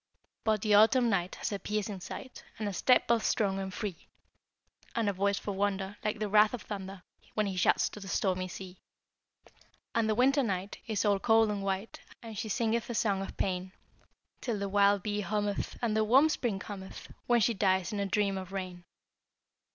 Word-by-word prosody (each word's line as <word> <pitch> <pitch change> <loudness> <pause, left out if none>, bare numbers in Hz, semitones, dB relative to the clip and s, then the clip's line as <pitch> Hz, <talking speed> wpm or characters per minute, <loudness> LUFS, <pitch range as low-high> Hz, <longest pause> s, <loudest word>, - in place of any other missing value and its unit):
But 215 -2 +1
the 215 -1 +2
Autumn 230 +3 +5
night 180 -2 0
Has - - -3
a 200 - -2
piercing 210 -1 -3
sight, 255 +7 -8
And 215 - -3
a 200 - -3
step 250 +6 +4
both 230 -2 +2
strong 195 -3 +1
and 190 0 -4
free; 185 -2 -6 0.9
And 230 -2 +1
a 200 - +1
voice 200 +1 +1
for 205 - -4
wonder, 195 0 -1
Like 210 +1 -1
the 215 0 -2
wrath 210 +3 +5
of 235 - -9
the - - -16
thunder, 195 -2 -6 0.3
When 215 - +2
he 195 -2 -3
shouts 180 - +3
to - - -10
the 195 - -9
stormy 185 -1 0
sea! 185 0 -9 1.1
And 225 -1 +1
the 215 - +2
Winter 270 +4 +4
night 195 -4 -3
Is 215 -2 0
all 200 -1 +3
cold 225 0 +4
and 205 -1 -3
white, 195 +2 -3 0.2
And 225 -1 -8
she 220 +1 -4
singeth 230 +3 0
a 235 - -3
song 200 -3 +1
of 195 - -7
pain; 185 0 -2 0.7
Till 235 -4 -2
the 200 0 -2
wild 200 -1 +4
bee 210 0 -1
hummeth, 205 0 -2
And 220 -2 +1
the 220 - +3
warm 265 +8 +5
spring 240 -9 -1
cometh, 195 -1 -8 0.2
When 240 -1 +4
she 230 +2 +3
dies 190 0 +1
in 205 - -2
a 200 - 0
dream 195 -1 +1
of 185 0 -9
rain! 185 -2 -5
205 Hz, 205 wpm, -30 LUFS, 195-220 Hz, 1.1 s, Autumn